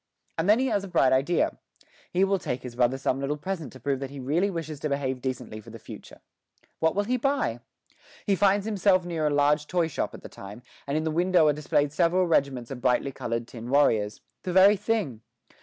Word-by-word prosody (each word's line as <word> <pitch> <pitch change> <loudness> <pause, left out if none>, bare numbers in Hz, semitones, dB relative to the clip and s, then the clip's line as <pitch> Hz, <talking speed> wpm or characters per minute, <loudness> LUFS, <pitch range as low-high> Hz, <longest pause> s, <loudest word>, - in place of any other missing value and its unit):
And 165 +4 -1
then 215 - +7
he 260 - +1
has 210 -6 0
a - - -6
bright 130 -7 +3
idea: 140 +7 +1 0.5
he 180 +2 +1
will 195 0 +2
take 125 -6 -4
his 125 -2 -8
brother 125 +1 +2
some 135 0 -1
little 140 +2 -2
present 165 -4 -5
to 130 - -12
prove 135 +1 -1
that 135 -1 -5
he 140 0 -9
really 155 +10 +1
wishes 160 -5 -5
to 150 - -2
behave 135 -2 -2
decently 125 -4 -5
for 110 - -14
the 115 - -9
future. - - -12 0.6
What 160 +1 +2
shall 205 - +1
he 250 +5 0
buy? 270 - 0 0.7
He 200 - +2
finds 200 +1 +3
himself 195 -4 +2
near 165 -3 -1
a - - +2
large 145 +1 +2
toy 175 -3 +1
shop 160 - -3
at - - -13
the - - -7
time, 105 +5 -11 0.2
and 140 +2 0
in 155 - -1
the 160 - -1
window 175 0 +3
are - - +3
displayed 145 -1 0
several 180 +3 +2
regiments 135 -7 0
of 125 -2 -6
brightly 130 +2 +1
coloured 115 -2 -4
tin 115 -1 -9
warriors 110 -7 +2 0.2
the 185 - -4
very 190 +3 +7
thing! 200 - -2
150 Hz, 225 wpm, -26 LUFS, 130-185 Hz, 0.7 s, then